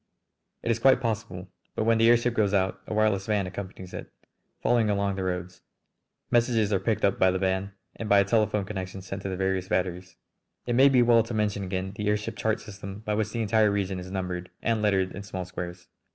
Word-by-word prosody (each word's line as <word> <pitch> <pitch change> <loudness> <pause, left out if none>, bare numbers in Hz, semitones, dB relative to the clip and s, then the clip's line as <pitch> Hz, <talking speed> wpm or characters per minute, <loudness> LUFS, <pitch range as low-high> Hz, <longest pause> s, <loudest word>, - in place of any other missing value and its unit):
"It 115 - +1
is 115 - 0
quite 135 +2 +5
possible. 110 -6 -3 0.3
But - - 0
when 115 0 +3
the 115 +1 +5
airship 120 0 +4
goes 105 -3 +2
out 95 -1 0
a - - -4
wireless 105 -2 +2
van 105 -3 +1
accompanies 95 -1 -8
it, - - -7 0.5
following 115 -3 +3
along 100 -1 +1
the 95 - -3
roads. 90 0 -4 0.7
Messages 115 -3 +2
are 95 - +3
picked 110 +2 0
up 100 - +1
by 95 - +5
the 95 - 0
van 95 +1 -1 0.2
and 110 - -5
by 100 - +6
a 100 - +3
telephone 105 -1 +1
connection 95 -2 -6
sent 95 +1 -6
to 95 - -4
the 95 - -3
various 95 -1 -1
batteries." 90 -1 -2 0.5
It 120 - -1
may 135 +3 +6
be 125 -3 +5
well 120 -1 +5
to 115 +1 -5
mention 105 -2 0
again 95 0 -3
the 105 +1 -3
airship 105 0 -1
chart 110 0 0
system 100 0 -9
by 105 -1 -2
which 105 0 0
the 115 +1 -2
entire 110 0 +3
region 100 -2 -1
is 90 0 -8
numbered 90 -2 -4
and 115 -2 +1
lettered 95 -3 +2
in 100 - -7
small 95 -2 -5
squares. 90 0 -7
100 Hz, 220 wpm, -27 LUFS, 95-110 Hz, 0.7 s, by